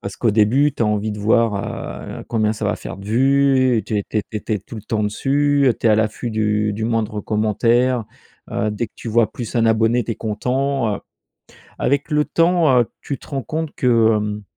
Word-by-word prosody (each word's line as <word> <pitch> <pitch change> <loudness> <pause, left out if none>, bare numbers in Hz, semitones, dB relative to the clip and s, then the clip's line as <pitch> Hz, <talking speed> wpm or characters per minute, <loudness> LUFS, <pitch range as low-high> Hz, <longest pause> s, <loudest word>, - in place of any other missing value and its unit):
Parce 100 - -7
qu'au 115 - +1
début, 120 +8 +3
tu 125 - -2
as 110 - +2
envie 105 0 0
de 105 - -6
voir, 110 0 +2 0.6
heu, - - -10
combien 110 -2 +1
ça 110 0 -5
va 105 - 0
faire - - -8
de 100 - -11
vues. 130 +1 +3
Et, 110 - 0
tu 105 - -2
es 100 - -3
tu 110 - -1
tu 110 - -4
es - - -3
tu 110 - -4
es 105 - +1
tout 110 - -11
le 105 - -8
temps 110 0 -2
dessus. 140 +5 +2
Tu - - 0
es - - +5
à 105 - +4
l'affût 110 +2 -1
du 105 -1 0
du 110 +2 -3
moindre 110 -2 -1
commentaire. 115 +4 +1 0.5
Heu, 105 - -1
dès 105 +2 -3
que - - -27
tu - - -8
vois 115 0 +2
plus 120 -3 -6
1 115 - +3
abonné, 115 +2 +2
tu 115 - -2
es - - -6
content, 125 +2 -1
heu. - - -11 0.8
Avec 140 +3 0
le 150 0 +2
temps, 165 -6 +3
heu, 120 - +1
tu 140 - -5
te - - -16
rends 135 -3 -3
compte 155 +6 -4
que, 125 - -2 0.3
hem 105 0 -3
115 Hz, 235 wpm, -20 LUFS, 105-130 Hz, 0.8 s, es